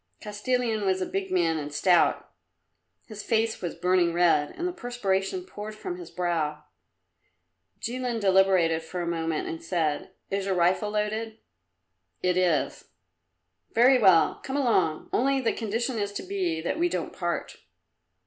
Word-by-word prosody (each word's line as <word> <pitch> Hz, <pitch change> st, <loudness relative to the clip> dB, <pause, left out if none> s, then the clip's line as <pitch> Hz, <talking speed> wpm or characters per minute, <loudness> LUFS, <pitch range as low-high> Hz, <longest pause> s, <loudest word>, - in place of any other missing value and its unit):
Kostilin 220 Hz, +1 st, -1 dB
was 190 Hz, -1 st, +1 dB
a 185 Hz, -, -1 dB
big 195 Hz, +1 st, -3 dB
man 170 Hz, -3 st, +1 dB
and 145 Hz, 0 st, -6 dB
stout; 175 Hz, +4 st, +2 dB, 0.7 s
his 215 Hz, -2 st, -8 dB
face 225 Hz, +1 st, 0 dB
was 175 Hz, -3 st, -4 dB
burning 180 Hz, -2 st, +2 dB
red, 170 Hz, -4 st, +3 dB
and 350 Hz, -, -4 dB
the -, -, -2 dB
perspiration 240 Hz, -, -2 dB
poured 215 Hz, -, -8 dB
from 180 Hz, -4 st, -6 dB
his 175 Hz, -1 st, -9 dB
brow. 165 Hz, -4 st, -2 dB, 1.2 s
Jilin 245 Hz, 0 st, -3 dB
deliberated 190 Hz, -4 st, +3 dB
for 175 Hz, +2 st, -5 dB
a -, -, -4 dB
moment 165 Hz, -2 st, -2 dB
and 165 Hz, 0 st, -5 dB
said, 165 Hz, -1 st, -1 dB, 0.2 s
"Is 195 Hz, 0 st, -1 dB
your 190 Hz, -, +1 dB
rifle 180 Hz, +4 st, +2 dB
loaded?" 215 Hz, +1 st, -2 dB, 0.9 s
"It 180 Hz, -1 st, +2 dB
is." 180 Hz, -4 st, +1 dB, 0.9 s
"Very 250 Hz, +3 st, +6 dB
well; 190 Hz, -7 st, +5 dB
come 270 Hz, +1 st, -3 dB
along. 190 Hz, -, +1 dB
Only 270 Hz, +2 st, +2 dB
the 245 Hz, -, 0 dB
condition 230 Hz, +2 st, -2 dB
is 205 Hz, -1 st, -2 dB
to -, -, -5 dB
be 180 Hz, -4 st, -2 dB
that 225 Hz, -, -2 dB
we 350 Hz, +1 st, +2 dB
don't -, -, -3 dB
part." -, -, -3 dB
190 Hz, 150 wpm, -27 LUFS, 170-225 Hz, 1.2 s, Very